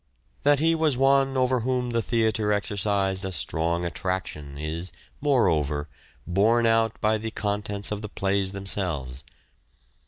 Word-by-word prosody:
That 145 0 +4
he 165 +3 +3
was 160 -5 +1
one 135 0 +3
over 130 0 +2
whom 125 +1 -1
the 115 0 +1
theatre 110 -2 +1
exercised 100 -1 0
a 95 - -3
strong 85 +1 -1
attraction 85 -5 -4
is, 80 +4 -4 0.3
moreover, 80 - +2 0.4
borne 110 +6 +3
out 115 -1 +2
by 110 0 +2
the 110 +1 -4
contents 105 -1 -3
of 105 -1 -3
the 105 - -6
plays 95 -1 0
themselves. 85 -10 -3
105 Hz, 135 wpm, -26 LUFS, 90-120 Hz, 0.4 s, That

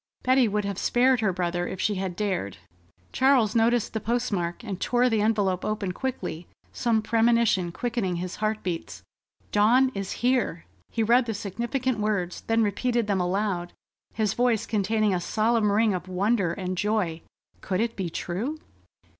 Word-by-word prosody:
Betty 255 -1 +4
would 210 0 -1
have 200 -1 -3
spared 255 +1 +3
her 210 -3 +2
brother 175 -1 -2
if 190 - -6
she 210 - +1
had 190 -2 -3
dared. 185 - -2 0.6
Charles 255 -6 +3
noticed 230 0 +2
the 220 - -1
postmark, 210 -5 -2
and 195 -5 -5
tore 250 0 +2
the 220 -2 +2
envelope 205 -4 +1
open 210 -3 -2
quickly, 180 -7 -4 0.3
some 225 -3 +1
premonition 225 -5 +2
quickening 230 -3 -2
his 180 +1 -5
heart 215 0 -1
beats. 175 -3 -5 0.5
"Dawn 245 +6 +4
is 195 -1 -4
here!" 245 -9 +1 0.2
He 225 - -1
read 240 +3 +4
the 225 - -2
significant 235 +5 -2
words, 205 -4 -1
then 225 0 +3
repeated 235 +3 0
them 200 -3 0
aloud, 180 -1 -1 0.4
his 215 -2 +1
voice 240 -3 +1
containing 215 0 +1
a 180 - 0
solemn 220 +2 +1
ring 215 0 +3
of 180 0 -4
wonder 190 0 +1
and 185 -1 -4
joy. 205 -6 0 0.4
Could 185 - -2
it 230 +1 -1
be 185 -3 -3
true? 205 - -3
210 Hz, 165 wpm, -26 LUFS, 185-235 Hz, 0.6 s, Betty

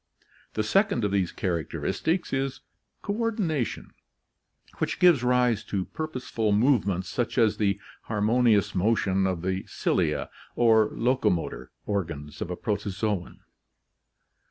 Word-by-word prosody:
The 110 - 0
second 195 - +2
of 100 - 0
these 95 -3 +1
characteristics 95 - -2
is 135 0 -1 0.4
coordination, 205 - -1 0.9
which - - -1
gives 175 -8 +5
rise 125 -3 +2
to 95 -2 -2
purposeful 125 -8 -2
move 120 0 +3
ments 95 -1 -1
such 120 +6 -2
as 115 -3 +3
the 100 -2 +1 0.3
harmonious 110 0 +2
motion 95 -1 +2
of 90 -3 -2
the 95 +1 -1
cilia - - 0 0.2
or 110 -2 +4
locomotor 105 - 0 0.2
organs 80 -8 -4
of - - -3
a 90 - -2
protozoon. 105 -2 -3
110 Hz, 115 wpm, -27 LUFS, 95-125 Hz, 0.9 s, gives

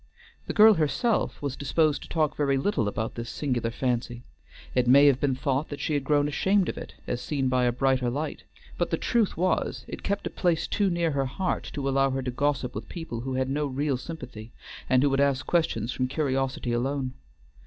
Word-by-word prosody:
The - - -2
girl 220 0 +8
herself 200 - 0
was 140 -3 -2
disposed 150 +1 +1
to - - -11
talk 155 -3 0
very 140 -2 +1
little 135 - 0
about 110 +2 -3
this 115 -1 -6
singular 125 -5 -1
fancy; 120 0 -2 0.5
it 125 -1 +2
may 140 +3 +7
have 140 -3 +5
been 135 -3 +1
thought 135 +3 -1
that 145 - -6
she 155 - -1
had 145 -2 0
grown 145 +1 +2
ashamed 190 +6 +2
of - - -3
it - - -10
as 120 - -3
seen 135 -4 -1
by 125 -1 +2
a 120 - +3
brighter 130 0 +1
light, 145 +6 -4 0.4
but - - +1
the - - 0
truth 230 -8 +1
was 185 +2 0
it - - -7
kept 200 0 -2
a - - -3
place 170 -3 +1
too 205 -2 +1
near 170 -2 0
her 135 -2 0
heart 180 +8 -2
to 140 -1 -3
allow 135 0 +3
her 135 0 -2
to 125 - -2
gossip 135 -1 -1
with - - -7
people 165 -9 -6
who 130 +1 -3
had 130 0 0
no 145 +1 0
real 140 +1 -1
sympathy, 125 -6 -8 0.4
and 130 0 +4
who 145 - +4
would 135 +1 +2
ask 140 -1 +1
questions 145 -10 0
from 130 0 -1
curiosity 135 -2 -1
alone. 130 +1 -1
135 Hz, 215 wpm, -27 LUFS, 130-155 Hz, 0.5 s, girl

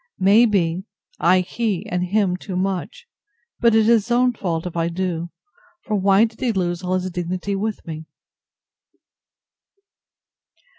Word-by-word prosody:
May 205 +5 +5
be, 185 -3 0 0.3
I 185 +1 +4
he 205 0 -2
and 180 0 -2
him 200 0 +1
him 180 - -2
too 185 0 -7
much: 190 - -3 0.5
but 235 -2 +4
it 220 - +6
is - - +1 0.2
his - - -13
own 245 +1 +3
fault 170 -6 -3
if 180 - -6
I 165 0 0
do. 170 -1 -3 0.5
For 215 - -2
why 195 +2 +4
did 220 -1 -9
he 250 - +1
lose 175 -3 -1
all 185 0 -1
his 185 0 -2
dignity 180 +3 -3
with 210 +2 -3
me? 160 -1 -7
185 Hz, 155 wpm, -21 LUFS, 175-215 Hz, 0.5 s, it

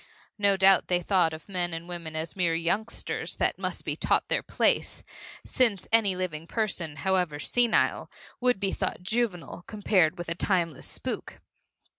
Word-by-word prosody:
No 200 -1 +3
doubt 190 -1 +5
they 180 -1 +2
thought 175 -2 +2
of 160 -1 -9
men 175 -3 -2
and 165 +1 -7
women 170 -3 -6
as 160 0 -4
mere 175 -3 +1
youngsters 200 +7 -2
that - - 0
must - - -4
be - - -1
taught - - +1
their - - +1
place, - - +1 0.4
since 225 -8 +1
any 215 -4 +4
living 170 -3 -4
person, 180 -9 -2
however 180 -3 0
senile, 235 +8 +1 0.3
would 250 -4 +2
be 195 -1 0
thought - - -2
juvenile 190 -5 -2
compared 195 -5 +2
with 175 - -6
a 170 - 0
timeless 170 -4 0
spook. - - -5
180 Hz, 160 wpm, -27 LUFS, 165-200 Hz, 0.4 s, doubt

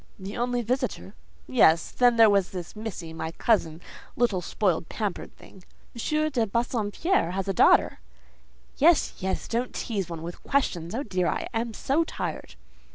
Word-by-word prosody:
"The 195 +1 -7
only 245 0 -1
visitor? 250 -4 -2 0.3
Yes; 170 -10 +4
then 245 -1 +4
there 225 -1 +7
was 190 -3 0
missy, 195 -7 -6
my 160 0 -5
cousin: 165 -6 +1 0.3
little 220 -7 +1
spoiled, 175 -2 -1
pampered 205 -5 -4
thing." 190 - -16 0.3
"M. 305 +6 0
de 235 -5 +1
Bassompierre 235 - 0
has 195 +1 -3
a 195 - 0
daughter?" - - +4 0.8
"Yes, 325 +2 +4
yes: 190 0 -3
don't 240 +2 -2
tease 200 -6 -3
one 165 -1 -6
with 170 +1 -7
questions. 190 -10 -1
Oh, 270 - -2
dear! 185 -6 -1
I - - -2
am 225 -1 -2
so 295 +5 +1
tired." - - -5
215 Hz, 155 wpm, -26 LUFS, 180-245 Hz, 0.8 s, there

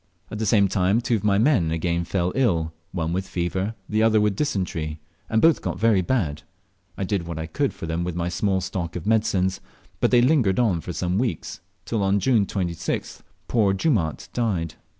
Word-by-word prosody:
At 105 - -5
the 110 - -1
same 100 -1 +4
time 95 +2 +2
two 120 -1 0
of 100 - -8
my 100 -2 +3
men 110 - +3
again 85 +1 -1
fell 90 0 0
ill, 85 -11 +1 0.2
one 85 -2 -2
with 95 +1 -2
fever, 95 +5 -2
the 110 0 +1
other 110 -1 +4
with 105 -1 +2
dysentery, 85 - -2 0.3
and 110 0 +1
both 165 -2 +5
got 90 -1 -3
very 105 -1 +3
bad. 85 - -1 0.6
I - - -2
did 95 -3 -2
what 85 -2 -5
I 80 - -3
could 140 - -1
for - - -8
them 80 +1 -2
with 90 -1 -3
my 85 0 -1
small 95 +2 0
stock 90 -2 -4
of 90 - -5
medicines, 100 -4 +1 0.4
but - - +3
they 120 -1 +5
lingered 125 -9 +3
on 105 -9 +2
for 90 - -6
some 90 +3 -1
weeks, 115 -10 -3 0.3
till 110 -3 -1
on 100 +1 +2
June 110 -3 +2
26th 85 -4 -3 0.3
poor 105 -5 +2
Jumaat 95 - 0
died. 95 -9 -1
95 Hz, 200 wpm, -24 LUFS, 85-110 Hz, 0.6 s, both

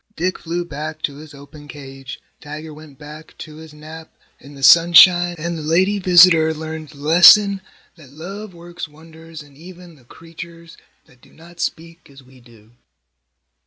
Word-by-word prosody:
Dick 185 +2 -4
flew 175 +1 -5
back 155 0 -9
to 140 -1 -5
his 150 0 -14
open 145 +1 -16
cage, 135 -2 -12 0.2
Tiger 155 +1 -10
went 150 -2 -16
back 150 +1 -14
to 155 -1 -12
his 160 -1 -14
nap 155 +2 -13 0.3
in 140 +1 -16
the 135 - -13
sunshine, 175 +3 +5
and 170 +2 -5
the 160 - -8
lady 185 +6 0
visitor 175 -3 +4
learned 155 -1 -9
the 145 - -18
lesson 185 +6 +5 0.4
that 150 -5 -18
love 195 +8 -10
works 175 -1 -11
wonders 160 +1 -15
in 145 -1 -22
even 175 +1 -15
the 130 - -24
creatures 165 +3 -14 0.3
that 125 - -26
do - - -23
not 170 +1 -19
speak 165 -1 -7
as 135 -1 -18
we 130 0 -21
do. 115 -3 -22
160 Hz, 165 wpm, -18 LUFS, 145-170 Hz, 0.4 s, sunshine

